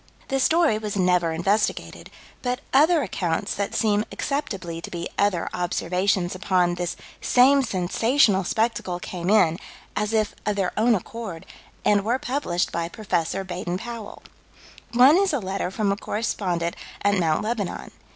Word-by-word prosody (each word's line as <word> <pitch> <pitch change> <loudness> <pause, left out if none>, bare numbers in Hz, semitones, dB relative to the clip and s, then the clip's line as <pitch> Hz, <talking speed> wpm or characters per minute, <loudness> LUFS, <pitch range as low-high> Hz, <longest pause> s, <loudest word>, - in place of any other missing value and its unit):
The 270 -1 +1
story 320 -5 +3
was 210 -2 -4
never 180 -3 +2
investigated, 195 +6 -1 0.3
but 250 +1 -2
other 310 +3 +5
accounts 175 -6 -2
that 200 0 -3
seem 210 -2 +2
acceptably 185 - -3
to - - -7
be 170 0 -4
other 200 -4 +1
observations 180 +1 0
upon 185 -2 +1
this 175 0 -3 0.3
same 270 +3 +5
sensational 205 +1 +2
spectacle 220 -4 -1
came 175 0 -4
in, 175 -5 +4 0.4
as 210 +1 -1
if 215 -1 +1
of 210 - 0
their 195 -3 0
own 230 +2 +3
accord, 195 -3 -6 0.4
and 205 -1 +4
were 235 +5 +1
published 245 -10 -1
by 170 0 -2
Prof. 190 -2 -2
Baden 180 -1 -3
Powell. 230 0 -8 0.7
One 260 +7 +7
is 390 -3 +2
a 285 - +1
letter 190 -2 -3
from 200 +1 0
a 200 - -1
correspondent 180 -6 -2 0.3
at 205 0 +3
Mt. 160 -1 +1
Lebanon. 215 -4 -3
200 Hz, 150 wpm, -24 LUFS, 175-230 Hz, 0.7 s, One